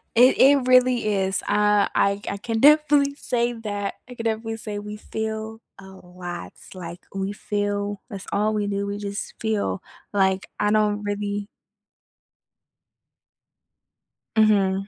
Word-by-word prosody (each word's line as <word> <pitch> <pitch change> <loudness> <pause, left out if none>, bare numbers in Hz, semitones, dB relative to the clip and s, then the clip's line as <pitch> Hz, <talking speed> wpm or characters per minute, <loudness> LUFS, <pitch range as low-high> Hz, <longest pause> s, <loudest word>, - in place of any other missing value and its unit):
It 250 +3 +6
it 275 -1 +6
really 250 -4 +4
is. 190 0 0
Uh, 210 -1 +3
I 200 0 +2
I 200 - -3
can 225 +2 -2
definitely 290 0 +5
say 240 -3 -1
that 205 -3 -4
I 250 - -9
can 230 - -6
definitely 225 0 -2
say 210 -2 -5
we 210 0 -7
feel 220 +1 -5 0.2
a 190 0 -12
lot, 180 - -8 0.2
like, 175 -1 -8
we 195 0 -2
feel 205 0 -2
that's 200 -4 -7
all 210 +1 +1
we 210 -1 -1
do. 200 0 -2
We 200 0 -3
just 200 0 -5
feel 220 -3 -1 0.3
like, 190 -1 +1
I 210 0 +2
don't 210 -1 +2
really 205 0 -3 2.9
Mhm. 200 -3 +3
210 Hz, 135 wpm, -24 LUFS, 200-225 Hz, 2.9 s, It